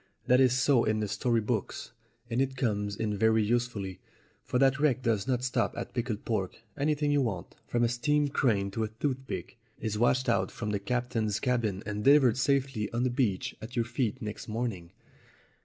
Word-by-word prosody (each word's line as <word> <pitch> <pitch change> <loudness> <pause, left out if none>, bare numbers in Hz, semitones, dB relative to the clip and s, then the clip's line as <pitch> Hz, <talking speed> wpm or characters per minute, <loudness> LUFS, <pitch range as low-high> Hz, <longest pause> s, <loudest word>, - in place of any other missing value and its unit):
That 125 +1 +5
is 130 -1 +4
so 130 -2 +4
in 110 0 +1
the 105 - -1
story 115 +2 +1
books, 110 -1 -3 0.4
and 120 +2 0
it 135 -1 -1
comes 105 -5 -1
in 105 0 -2
very 110 +1 +3
usefully, 110 -4 -1 0.4
for - - -1
that 135 +2 +3
wreck 135 -4 +2
does 110 -5 0
not 125 -2 0
stop 125 -5 0
at - - -5
pickled 120 -4 -3
pork. 100 -5 -2 0.2
Anything 145 0 +1
you 145 -1 +3
want, 100 -8 -3
from 120 0 +1
a - - +4
steam 145 +5 +1
crane 105 -8 +1
to 110 +3 -2
a - - 0
toothpick, 130 -3 -3 0.2
is 105 -2 -2
washed 130 +2 +2
out 95 -1 +1
of 105 -2 -2
the 100 - 0
cap 125 +4 -2
tain's 110 -3 0
cabin 115 -6 0
and 105 0 -3
delivered 135 -4 +6
safely 135 -5 0
on 120 +1 0
the 130 - +1
beach 120 -7 0
at 115 +3 -8
your 120 -2 +1
feet 120 +1 -2
next 105 -1 -6
morning." 110 -7 -3
120 Hz, 195 wpm, -29 LUFS, 105-130 Hz, 0.4 s, delivered